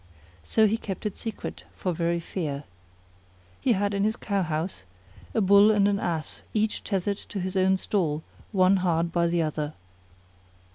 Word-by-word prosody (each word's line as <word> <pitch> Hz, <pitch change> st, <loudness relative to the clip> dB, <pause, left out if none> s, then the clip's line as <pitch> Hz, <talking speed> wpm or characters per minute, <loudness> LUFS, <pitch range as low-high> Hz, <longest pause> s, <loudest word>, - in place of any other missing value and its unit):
So 220 Hz, -, +3 dB
he 215 Hz, +1 st, +2 dB
kept 200 Hz, -2 st, -6 dB
it 210 Hz, -, -2 dB
secret 225 Hz, -2 st, -6 dB
for 180 Hz, -, -2 dB
very 170 Hz, +1 st, 0 dB
fear. 150 Hz, -5 st, -4 dB, 1.0 s
He 250 Hz, -, +3 dB
had 205 Hz, 0 st, 0 dB
in 200 Hz, 0 st, +1 dB
his 215 Hz, +1 st, +1 dB
cow 200 Hz, -4 st, -1 dB
house 160 Hz, -, -2 dB, 0.5 s
a 225 Hz, -, +3 dB
Bull 200 Hz, +2 st, +7 dB
and 205 Hz, -2 st, +4 dB
an 200 Hz, -1 st, +1 dB
Ass 165 Hz, -5 st, -3 dB
each 215 Hz, 0 st, +1 dB
tethered 200 Hz, 0 st, -1 dB
in 195 Hz, -, -1 dB
his 185 Hz, +1 st, -3 dB
own 190 Hz, 0 st, +4 dB
stall 160 Hz, -6 st, -1 dB, 0.3 s
one 190 Hz, -1 st, +4 dB
hard 170 Hz, -2 st, +1 dB
by 170 Hz, 0 st, +2 dB
the 170 Hz, 0 st, +1 dB
other. 150 Hz, -1 st, -2 dB
190 Hz, 170 wpm, -27 LUFS, 170-205 Hz, 1.0 s, Bull